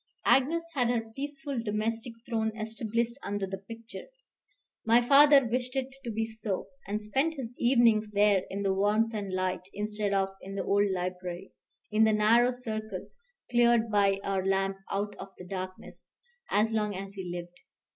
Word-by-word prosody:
Agnes 315 +6 +3
had 250 -5 +1
her 225 -2 -1
peaceful 280 -2 -4
domestic 225 +2 -2
throne 220 -2 0
established 225 +3 -2
under 200 -1 -2
the 190 0 -6
picture. 230 +3 -10 0.8
My 230 +1 +5
father 285 -1 +7
wished 250 +2 -2
it 265 0 -2
to 240 - -4
be 225 0 -1
so, 220 -3 -4 0.2
and 205 +1 -1
spent 265 +10 0
his 250 -4 -6
evenings 235 -4 +4
there 205 -2 +4
in 200 +1 -3
the 195 -1 +2
warmth 210 +4 +2
and 205 -3 -4
light, 185 -1 -1
instead 210 0 -2
of 195 -1 +2
in 195 +1 -8
the 195 - -2
old 200 +1 +2
library, 180 0 -4 0.4
in 215 +1 +4
the 220 0 +4
narrow 225 +3 +5
circle 220 -3 -5 0.4
cleared 235 -2 +4
by 200 -1 +3
our 195 -1 -1
lamp 195 0 +1
out 205 +1 -2
of - - -7
the 180 - -10
darkness, 185 0 -7 0.4
as 215 +2 +2
long 210 -2 0
as 195 +1 -6
he 190 -3 -6
lived. 175 0 -7
215 Hz, 165 wpm, -29 LUFS, 195-235 Hz, 0.8 s, father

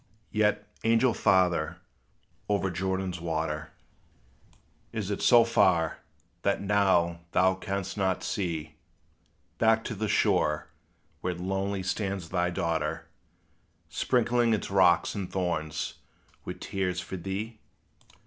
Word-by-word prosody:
Yet, 105 -1 +1 0.2
angel 115 +2 +4
father, 90 -6 +2 0.7
over 100 -2 +1
Jordan's 95 -1 -2
water 80 -2 -2 1.2
Is 105 -2 -3
it 100 - -2
so 120 -2 +7
far, 90 -8 +2 0.4
that - - +1
now 95 -4 +2
thou 95 0 +4
canst 95 +1 -4
not 95 -2 0
see 80 -5 -3 0.9
Back 110 0 +4
to - - -4
the 110 +1 -2
shore, 75 -6 +2 0.5
where 90 -1 -2
lonely 95 +2 -2
stands 95 -2 -2
thy 90 -1 +1
daughter, 85 -2 -2 0.8
Sprinkling 120 +5 +2
its 100 - -5
rocks 90 -3 +4
and 100 -3 -4
thorns 85 -5 -2 0.5
with 90 0 -6
tears 90 -2 -2
for 95 - -6
thee? 100 +5 -5
95 Hz, 110 wpm, -28 LUFS, 85-105 Hz, 1.2 s, so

